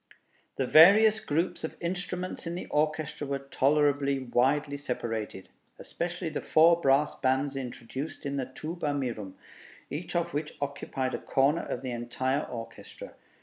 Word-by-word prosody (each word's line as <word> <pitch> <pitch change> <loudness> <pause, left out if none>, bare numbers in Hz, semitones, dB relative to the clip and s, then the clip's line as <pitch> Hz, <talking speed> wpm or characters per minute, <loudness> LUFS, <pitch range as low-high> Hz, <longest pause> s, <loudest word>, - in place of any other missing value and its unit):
The 135 - 0
various 205 - +7
groups 165 -3 -1
of 160 - -5
instruments 180 0 -4
in 170 - -3
the 180 - -5
orchestra 150 -1 -1
were 140 0 -1
tolerably 140 0 +2
widely 135 +3 +1
separated, 115 -7 -4 0.3
especially 175 0 -4
the - - -4
four 165 +2 +5
brass 135 +1 +3
bands 135 +1 0
introduced 130 +3 -6
in 140 0 -2
the 130 - -1
'Tuba 155 +2 -4
mirum,' 115 -8 -4 0.6
each 165 +5 -5
of 170 -1 0
which 150 +1 -4
occupied 135 -2 -3
a - - -2
corner 140 +5 +2
of - - -5
the 130 - -3
entire 130 +4 -1
orchestra. 115 -2 -9
140 Hz, 145 wpm, -29 LUFS, 130-160 Hz, 0.6 s, various